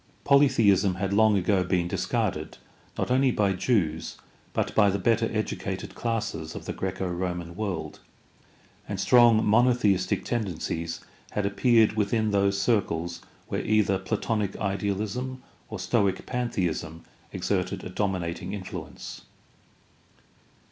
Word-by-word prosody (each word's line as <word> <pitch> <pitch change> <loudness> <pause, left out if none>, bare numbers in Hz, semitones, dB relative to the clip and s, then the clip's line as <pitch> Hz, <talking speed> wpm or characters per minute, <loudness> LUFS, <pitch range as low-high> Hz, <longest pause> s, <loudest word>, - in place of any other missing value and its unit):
Polytheism 115 -10 +4
had 100 +1 -2
long 110 0 +5
ago 95 0 +2
been 90 -1 0
discarded, - - -2 0.4
not - - -1
only 130 +1 +4
by 100 -5 +1
Jews, 90 -6 0 0.3
but - - -1
by 105 -2 +5
the 100 - 0
better 115 +3 +2
educated 100 -3 -3
classes 105 -9 -3
of - - -7
the - - -3
Graeco 95 0 -3
Roman 90 -1 -4
world, 100 -4 -4 0.9
and 100 -2 -3
strong 120 +1 +5
monotheistic 110 -4 +3
tendencies 85 -7 -3 0.3
had 105 - -1
appeared 110 +2 +4
within 110 +1 +1
those 100 0 +2
circles 85 -5 0 0.3
where - - -2
either 105 -3 +2
Platonic 105 0 -2
idealism 105 +6 -2 0.3
or - - -5
Stoic 95 -2 0
pantheism 85 -10 -2 0.3
exerted 95 -1 -2
a - - -6
dominating 90 -2 -2
influence. 95 -3 -7
100 Hz, 120 wpm, -26 LUFS, 95-110 Hz, 0.9 s, long